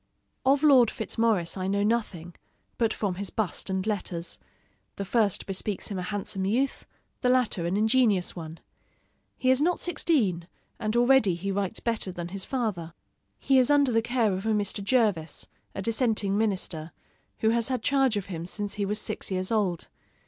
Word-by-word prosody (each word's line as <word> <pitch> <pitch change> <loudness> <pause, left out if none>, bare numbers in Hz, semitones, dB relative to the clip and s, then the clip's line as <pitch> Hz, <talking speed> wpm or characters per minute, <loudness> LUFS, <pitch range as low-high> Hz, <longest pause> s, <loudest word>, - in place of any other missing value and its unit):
Of 275 +2 +4
Lord 260 -6 +6
Fitzmaurice 220 -6 0
I 185 0 -2
know 200 +1 +1
nothing, 205 -6 -1 0.5
but 225 -2 +2
from 205 -4 -1
his 200 - -2
bust 210 -2 -2
and 190 0 -1
letters: 180 -5 -3 0.6
the 200 - -4
first 205 -1 +1
bespeaks 195 +1 -3
him 195 -3 -3
a - - -2
handsome 195 0 -3
youth, 245 +8 -1 0.3
the 250 - +2
latter 245 -9 +1
an 185 +3 0
ingenious 220 -4 +2
one. 165 -1 -8 0.8
He 255 - +2
is 260 +2 +3
not 350 +3 +2
sixteen, 215 - 0 0.3
and 215 +1 -2
already 240 -6 +4
he 195 +3 -3
writes 200 +1 -2
better 225 -5 -1
than 175 -1 -6
his 190 +1 -4
father. 195 -10 -3 0.4
He 270 -1 +3
is 255 - +3
under 285 -3 +4
the 225 -1 +3
care 230 -3 +1
of 190 +4 -3
a 220 - +2
Mr. 205 -1 -1
Jervis, 200 - +1 0.3
a 195 - -4
dissenting 220 -3 0
minister, 185 -7 -1 0.5
who 220 - +3
has 230 -1 +1
had 255 -4 -2
charge 270 -5 +2
of 200 - -3
him 170 -3 -6
since 205 +2 -4
he 205 -1 -1
was 210 +2 -1
six - - -3
years 185 +1 -1
old. 195 -6 0
210 Hz, 180 wpm, -27 LUFS, 185-235 Hz, 0.8 s, Lord